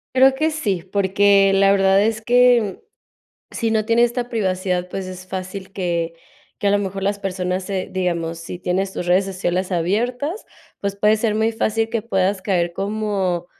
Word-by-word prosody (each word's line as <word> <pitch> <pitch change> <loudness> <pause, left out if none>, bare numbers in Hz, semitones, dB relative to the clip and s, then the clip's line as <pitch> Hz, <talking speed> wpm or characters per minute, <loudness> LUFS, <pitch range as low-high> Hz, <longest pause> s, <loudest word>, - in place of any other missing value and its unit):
Creo 265 +1 +6
que 310 +3 +1
sí, 205 - -2
porque 195 0 +4
la 195 0 +4
verdad 195 0 +4
es 220 0 0
que, 245 - +3 0.7
si 230 -2 -1
no 215 -1 +1
tiene 230 +2 +4
esta 240 0 -2
privacidad, 185 -5 -1
pues, 190 0 -5
es 185 0 -9
fácil 185 +1 -6
que 170 -3 -2 0.5
que - - -1
a - - +4
lo 205 - +3
mejor 195 -1 -3
las 200 +1 -1
personas 185 -1 -2
se 190 -1 -3
digamos, 170 -3 -2
si 165 +1 -7
tienes 185 +2 -1
tus 175 - -5
redes 185 +2 +3
sociales 185 -1 -2
abiertas, 245 - -1 0.4
pues, 200 -1 -2
puede 210 +2 +3
ser 215 -1 0
muy 220 +1 +2
fácil 225 0 0
que 225 -1 -2
puedas 195 -2 0
caer 175 -3 0
como 195 -3 -2
195 Hz, 175 wpm, -21 LUFS, 185-220 Hz, 0.7 s, Creo